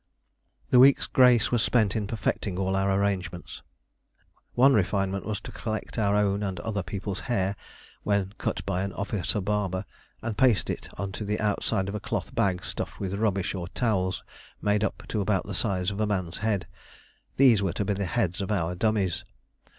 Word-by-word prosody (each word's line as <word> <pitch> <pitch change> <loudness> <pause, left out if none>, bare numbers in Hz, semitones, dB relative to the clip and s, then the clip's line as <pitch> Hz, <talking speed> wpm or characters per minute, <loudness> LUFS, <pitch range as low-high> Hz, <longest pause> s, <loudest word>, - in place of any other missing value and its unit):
The 125 - +7
week's 135 +2 +7
grace 125 -3 +5
was 120 -2 +3
spent 110 -6 +2
in 105 -2 -1
perfecting 105 -3 -2
all 95 0 0
our 95 0 +2
arrangements. 95 -3 -2 0.9
One 135 +3 +6
refinement 100 -1 0
was 105 -1 -2
to - - -8
collect 110 +1 -4
our 100 -1 +2
own 100 -1 +2
and 95 -3 -3
other 105 -1 -2
people's 100 +1 -4
hair 100 -4 +1 0.5
when 100 -1 0
cut - - -2
by 95 -2 -1
an 100 0 -3
officer 100 0 -1
barber, 100 -1 -1 0.4
and 110 -2 -2
paste 125 -5 +3
it - - -6
on 100 -1 -3
to 95 - -5
the 105 +1 -1
outside 105 -1 0
of 100 - -4
a 105 - -2
cloth - - -4
bag 95 -3 0
stuffed - - -5
with 95 -1 -3
rubbish 100 -2 0
or 90 -3 -4
towels 95 -4 0 0.4
made 105 0 +1
up 100 - -2
to 105 - 0
about 100 -1 +1
the - - -5
size 95 -3 0
of 100 - -5
a 105 - +2
man's 90 -5 -2
head. 105 -3 0 0.7
These 125 -6 +6
were 95 -3 0
to 100 - -2
be 100 - +1
the 100 0 -2
heads 105 -4 0
of 100 - -3
our 90 -4 0
dummies. 95 -1 0
100 Hz, 190 wpm, -27 LUFS, 95-110 Hz, 0.9 s, The